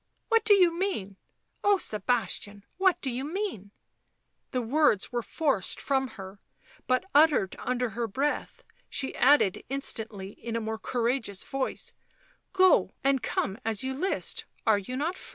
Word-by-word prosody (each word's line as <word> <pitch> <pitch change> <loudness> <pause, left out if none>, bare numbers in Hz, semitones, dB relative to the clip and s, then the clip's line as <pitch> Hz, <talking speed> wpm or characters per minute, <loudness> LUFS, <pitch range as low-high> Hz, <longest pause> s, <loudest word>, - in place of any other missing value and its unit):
" - - -48
What 455 -2 +4
do 430 -2 +6
you 360 -4 +5
mean? 280 - -2 0.5
Oh, 405 0 +5
Sebastian, 210 - -1
what 375 -1 +4
do 265 - -1
you 250 +2 -3
mean 315 - -4 0.4
?" - - -49
The 250 -1 -1
words 255 -4 +2
were 240 -1 -1
forced 275 - 0
from 265 -1 0
her, 195 0 -9 0.5
but 255 +7 +2
uttered 295 -10 +4
under 250 -1 -1
her 230 +1 -2
breath; 275 +8 -2 0.3
she 270 -1 -1
added 260 -8 +4
instantly, 220 -7 -3
in 230 +2 -6
a - - +1
more 220 0 -4
courageous 230 -4 -1
voice, 270 -1 -3 0.3
" - - -34
Go 375 -1 +4
and 275 -2 +3
come 195 +3 -2
as 220 0 -1
you 265 0 -2
list, 365 +9 -2 0.2
are 215 -2 +4
you 250 +6 -5
not 325 +6 -1
free - - -10
255 Hz, 165 wpm, -28 LUFS, 220-305 Hz, 0.5 s, do